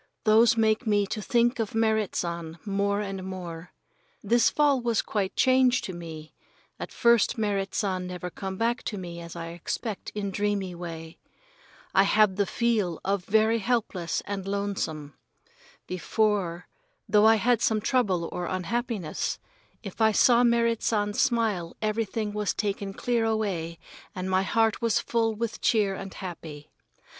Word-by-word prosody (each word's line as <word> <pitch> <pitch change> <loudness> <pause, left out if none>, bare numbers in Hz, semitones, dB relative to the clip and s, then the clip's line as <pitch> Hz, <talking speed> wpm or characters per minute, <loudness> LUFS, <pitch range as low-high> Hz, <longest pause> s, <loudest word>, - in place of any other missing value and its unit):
Those 225 +2 +5
make 220 +2 +2
me 205 -1 +3
to 210 +2 -4
think 240 +3 +2
of 220 -1 -2
Merrit 220 -2 +1
San 170 -1 -3
more 200 0 0
and 195 -2 -5
more. 180 -2 -7 0.5
This 235 0 +4
fall 290 -3 +2
was 235 -2 +1
quite 200 -3 -2
changed 255 -1 +4
to 185 - -5
me. 160 -2 -9 0.5
At - - -6
first 235 -2 +3
Merrit 200 -3 -1
San 185 -3 -1
never 180 0 -6
come 190 +1 -5
back 235 +2 0
to 210 - -3
me 175 -2 -7
as 170 0 -9
I 165 -1 -5
expect 185 +5 -5
in 200 -2 -2
dreamy 200 -2 -1
way. 165 -2 -8 0.7
I 195 - +6
have 200 0 +4
the 200 0 +1
feel 215 -8 0
of 195 -1 0
very 220 +2 +3
helpless 200 -7 -1
and 195 -1 -4
lonesome. 195 -7 -3 0.7
Before, 185 -1 -1 0.4
though 210 0 +5
I 225 - +7
had 230 +2 +2
some 220 -1 +2
trouble 200 -8 +1
or 175 -1 -3
unhappiness, 195 -2 -2 0.5
if 200 +1 -7
I 220 0 +5
saw 240 +2 +5
Merrit 235 -1 +2
San's 205 -2 0
smile 225 -9 0
everything 215 -1 -2
was 210 -1 -1
taken 200 -1 -2
clear 240 -2 0
away 195 -7 -1 0.4
and 185 0 -4
my 185 0 +3
heart 225 +3 +1
was 230 -2 +2
full 225 -1 0
with 230 +1 -4
cheer 210 -4 +2
and 195 0 -7
happy. 160 -6 -8
205 Hz, 155 wpm, -27 LUFS, 185-225 Hz, 0.7 s, I